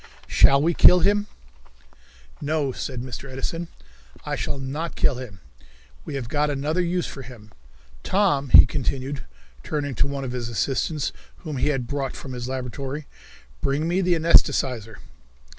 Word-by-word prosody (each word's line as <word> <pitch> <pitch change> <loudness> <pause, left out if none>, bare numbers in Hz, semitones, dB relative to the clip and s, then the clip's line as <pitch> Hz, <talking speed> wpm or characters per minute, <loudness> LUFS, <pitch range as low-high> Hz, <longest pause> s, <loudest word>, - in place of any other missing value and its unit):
Shall 140 0 +5
We 170 +2 +2
Kill 180 +2 +7
Him? 205 +3 +2 1.1
"No," 145 -2 0
said 125 -1 -5
Mr. 130 +1 -7
Edison, 165 +6 -4 0.6
"I - - -2
shall - - -3
not 145 +5 -4
kill 135 -4 +1
him. 105 -9 -9 0.6
We - - -5
have 130 -4 -4
got 150 +4 0
another 145 +5 0
use 175 0 0
for 135 - -7
him. 115 -4 -12 0.5
Tom," 145 - +1
he - - +10
continued, 135 +1 -3 0.4
turning 145 - -3
to 130 - +1
one 140 -1 -4
of 130 - -4
his 120 -2 -4
assistants, 135 +6 -1 0.3
whom 155 -5 -4
he 125 - +1
had 135 -4 0
brought 135 0 -3
from 130 - -8
his 120 0 -5
laboratory, 130 +3 -5 0.6
"bring 145 +4 0
me 180 +3 +1
the 180 -1 +2
anaesthetizer." 130 -8 +3
140 Hz, 155 wpm, -24 LUFS, 130-155 Hz, 1.1 s, he